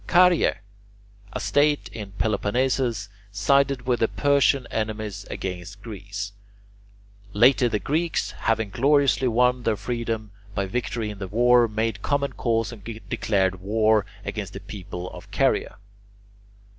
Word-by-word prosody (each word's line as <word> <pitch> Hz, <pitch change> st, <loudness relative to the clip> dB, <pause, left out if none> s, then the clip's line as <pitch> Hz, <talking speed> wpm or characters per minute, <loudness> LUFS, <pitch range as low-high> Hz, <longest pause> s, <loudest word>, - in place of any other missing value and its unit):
Caryae, 180 Hz, -1 st, +5 dB, 0.8 s
a 125 Hz, -, -4 dB
state 145 Hz, +8 st, +2 dB
in 105 Hz, -3 st, -7 dB
Peloponnesus, 110 Hz, +2 st, 0 dB, 0.2 s
sided 140 Hz, +4 st, +2 dB
with 125 Hz, -1 st, +1 dB
the 115 Hz, -, +3 dB
Persian 140 Hz, -1 st, +2 dB
enemies 110 Hz, -2 st, -3 dB
against 95 Hz, +2 st, -6 dB
Greece; 100 Hz, -1 st, -6 dB, 1.0 s
later 120 Hz, +3 st, +5 dB
the 110 Hz, -, 0 dB
Greeks, 160 Hz, +9 st, -1 dB
having 110 Hz, -2 st, -1 dB
gloriously 140 Hz, +1 st, +3 dB
won 125 Hz, +1 st, +3 dB
their 115 Hz, -3 st, 0 dB
freedom 115 Hz, -3 st, -3 dB, 0.2 s
by 100 Hz, -, 0 dB
victory 115 Hz, +1 st, -2 dB
in 100 Hz, -, -10 dB
the 95 Hz, -, -4 dB
war, 120 Hz, +3 st, +4 dB
made 110 Hz, -1 st, -2 dB
common 140 Hz, +2 st, 0 dB
cause 115 Hz, -1 st, 0 dB
and 110 Hz, -4 st, -11 dB
declared 100 Hz, -4 st, -1 dB
war 110 Hz, +1 st, +3 dB, 0.2 s
against -, -, -4 dB
the -, -, -6 dB
people 90 Hz, -3 st, -7 dB
of -, -, -11 dB
Caryae. -, -, +1 dB
115 Hz, 130 wpm, -24 LUFS, 105-125 Hz, 1.0 s, Caryae